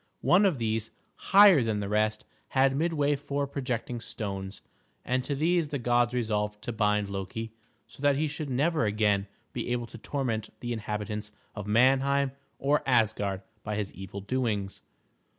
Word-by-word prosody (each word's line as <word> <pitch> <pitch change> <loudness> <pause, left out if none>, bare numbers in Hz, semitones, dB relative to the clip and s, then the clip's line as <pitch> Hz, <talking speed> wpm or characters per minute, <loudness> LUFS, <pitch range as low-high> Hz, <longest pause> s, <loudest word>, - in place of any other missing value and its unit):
One 195 +3 +5
of 175 -7 0
these, 110 -1 -1 0.2
higher 195 -6 +6
than 110 -3 0
the 100 - -3
rest, 110 +1 0 0.2
had 135 0 +3
midway 145 -2 +1
four 140 0 -2
projecting 125 -4 -3
stones, 100 -4 -6 0.4
and 130 +1 0
to 140 +2 -2
these 165 +2 +2
the 145 -1 -3
gods 120 -1 +2
resolved 105 -3 -1
to - - -3
bind 105 -1 +1
Loki 100 +3 -5 0.3
so - - -16
that 145 -1 +4
he 155 +3 +1
should 150 0 -5
never 145 +1 +1
again 105 -1 +1 0.3
be 120 0 -3
able 120 -1 -1
to 115 - -11
torment 115 -4 -2
the 120 0 -3
inhabitants 105 -1 -4 0.2
of 105 -1 -6
Manheim 135 +4 +3 0.3
or 145 +2 +2
Asgard 105 -5 +1 0.2
by 105 0 -3
his 105 -1 -3
evil 95 +1 -7
doings. 105 -3 -2
120 Hz, 160 wpm, -28 LUFS, 105-140 Hz, 0.4 s, higher